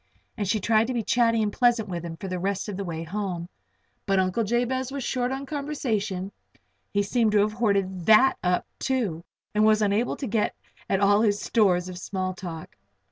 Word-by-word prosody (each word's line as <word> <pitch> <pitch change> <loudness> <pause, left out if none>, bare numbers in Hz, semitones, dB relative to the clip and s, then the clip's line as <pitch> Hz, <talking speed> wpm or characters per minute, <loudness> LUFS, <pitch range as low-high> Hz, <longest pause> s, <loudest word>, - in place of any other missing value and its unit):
And 205 - -2
she 215 +3 +1
tried 220 +2 +2
to 255 - -2
be 230 - 0
chatty 230 0 +2
and 205 -1 -1
pleasant 240 -3 +2
with 175 -3 -4
him 165 -1 -6
for 195 - -6
the 185 -1 -3
rest 195 +2 -2
of 205 - -4
the 200 - -3
way 165 -3 -4
home. 180 -1 -4 0.6
But 195 -1 +2
Uncle 185 +4 +1
Jabez 245 +4 0
was 275 -1 -4
short 250 0 -1
on 270 +1 -4
conversation 225 -10 -2 0.6
he 205 0 +1
seemed 220 +1 +1
to 210 - +5
have 210 +1 +1
hoarded 195 -6 0
that 220 +5 +6
up, 180 0 +1
too, 220 -12 -1 0.3
and 210 0 +3
was 215 0 +4
unable 210 +4 +1
to 275 - -4
get 215 -2 0 0.3
at 195 +1 +1 0.2
his 205 -2 +2
stores 185 -6 +2
of 180 -1 -7
small 185 0 -3
talk. 175 -4 -8
210 Hz, 195 wpm, -26 LUFS, 185-235 Hz, 0.6 s, that